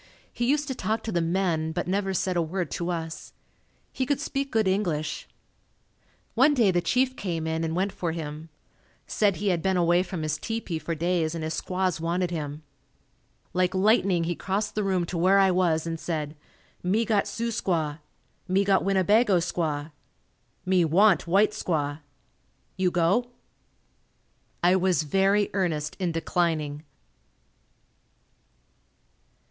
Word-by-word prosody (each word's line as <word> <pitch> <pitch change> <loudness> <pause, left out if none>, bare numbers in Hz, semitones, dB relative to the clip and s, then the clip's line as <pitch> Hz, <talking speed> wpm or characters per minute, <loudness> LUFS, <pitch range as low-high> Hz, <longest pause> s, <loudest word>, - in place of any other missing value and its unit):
He 240 0 -1
used 295 0 +1
to 265 - -2
talk 220 -1 -2
to 225 - -3
the 175 -3 +1
men 165 -2 0
but 175 - -3
never 195 +1 0
said 190 0 -1
a 170 - +2
word 170 0 -3
to 175 0 -3
us. 165 -2 -5 0.6
He 260 - -2
could 285 -2 +1
speak 275 -1 -3
good 220 -3 +2
English. 165 -6 -1 1.1
One 280 +5 +4
day 225 -7 +4
the 175 -1 +1
chief 255 +8 +1
came 170 -5 -3
in 160 0 -1
and 160 0 -2
went 190 +2 0
for 170 -3 -3
him. 155 -1 -6 0.6
Said 205 -3 +1
he 205 0 -1
had 175 -3 +1
been 190 0 +1
away 175 0 +3
from 180 -3 -4
his 155 0 -2
tepee 225 -8 -3
for 165 +1 -3
days 170 0 0
and 165 - -4
his 160 0 -2
squaws 185 -3 -1
wanted 175 +2 -1
him. 150 -2 -5 0.9
Like 185 +1 +1
lightning 190 -3 +3
he 170 +1 -1
crossed 200 +4 -2
the 210 - -1
room 190 -3 +1
to 170 0 -4
where 190 +3 +4
I 195 -1 +5
was 170 -3 +1
and 165 -1 -4
said, 155 -3 -3 0.5
"Me 210 +6 +1
got 210 -2 +1
Sioux 235 +1 -3
squaw. 160 -8 -1 0.5
Me 190 +2 +2
got 195 -1 +3
Winnebago 195 +2 +3
squaw. 160 -3 -2 0.7
Me 185 -1 +3
want 180 +2 +4
white 200 +5 +4
squaw. 155 -8 -2 0.8
You 185 -1 +1
go?" 180 +8 +1 1.3
I 180 +1 +5
was 185 -4 +2
very 195 +6 +2
earnest 160 -6 -1
in 180 -3 0
declining. 160 -3 -1
180 Hz, 155 wpm, -26 LUFS, 165-195 Hz, 1.3 s, I